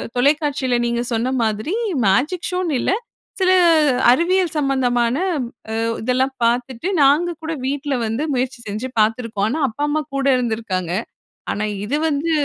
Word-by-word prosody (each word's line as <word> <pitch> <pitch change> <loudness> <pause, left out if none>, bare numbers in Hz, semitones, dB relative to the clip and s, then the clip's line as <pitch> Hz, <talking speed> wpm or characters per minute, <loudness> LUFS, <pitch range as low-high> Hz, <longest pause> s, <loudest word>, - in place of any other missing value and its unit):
தொலைக்காட்சியில 280 -1 +1
நீங்க 235 0 0
சொன்ன 235 +3 0
மாதிரி 220 - -1 0.3
மேஜிக் 275 - +1
ஷோனு 360 -3 -1
இல்ல - - 0 0.5
சில 370 -1 +3 0.6
அறிவியல் 345 +4 +2
சம்மந்தமான 250 -4 +1 0.6
அ - - -3 0.3
இதெல்லாம் 255 +3 0
பார்த்துட்டு 245 +6 0
நாங்க 310 +5 +3
கூட 320 - -3
வீட்ல 280 +1 -2
வந்து 225 +6 -2
முயற்சி 255 0 -2
செஞ்சு 215 +5 -4
பார்த்துருக்கோம். 220 -1 +1
ஆனா, 310 +5 -2
அப்பா 225 +6 -5
அம்மா 310 +1 0
கூட 275 0 -1
இருந்துருக்காங்க. 220 -7 -2 0.6
ஆனா 210 - -2 0.2
இது 255 +8 -1
வந்து 305 +2 -1
260 Hz, 135 wpm, -20 LUFS, 230-295 Hz, 0.6 s, சில